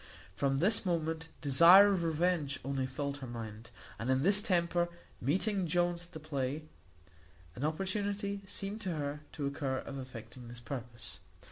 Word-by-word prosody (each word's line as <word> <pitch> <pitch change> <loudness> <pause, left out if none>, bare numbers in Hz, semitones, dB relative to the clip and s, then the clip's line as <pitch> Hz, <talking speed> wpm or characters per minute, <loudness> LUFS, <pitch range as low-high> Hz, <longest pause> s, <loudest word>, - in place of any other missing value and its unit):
From 135 +4 +1
this 195 +9 +3
moment 165 -3 -1
desire 170 +8 +8
of 180 -3 0
revenge 160 -3 +1
only 135 -1 -1
filled 140 +2 -3
her 135 -2 -7
mind; 115 -1 -7 0.3
and 115 - -3
in 130 +1 +2
this 200 +3 +5
temper 175 -3 +1 0.3
meeting 190 - +1
Jones 175 +1 0
at 175 - -25
the 160 - -6
play, 145 -1 -3 0.9
an 130 - -5
opportunity 200 +5 -1
seemed 200 +3 -3
to 185 -5 -2
her 145 0 -3
to 145 - -3
occur 140 -1 -1
of 135 +1 -6
effecting 125 -1 -9
this 120 0 -9
purpose. 120 -2 -7
155 Hz, 155 wpm, -33 LUFS, 135-180 Hz, 0.9 s, desire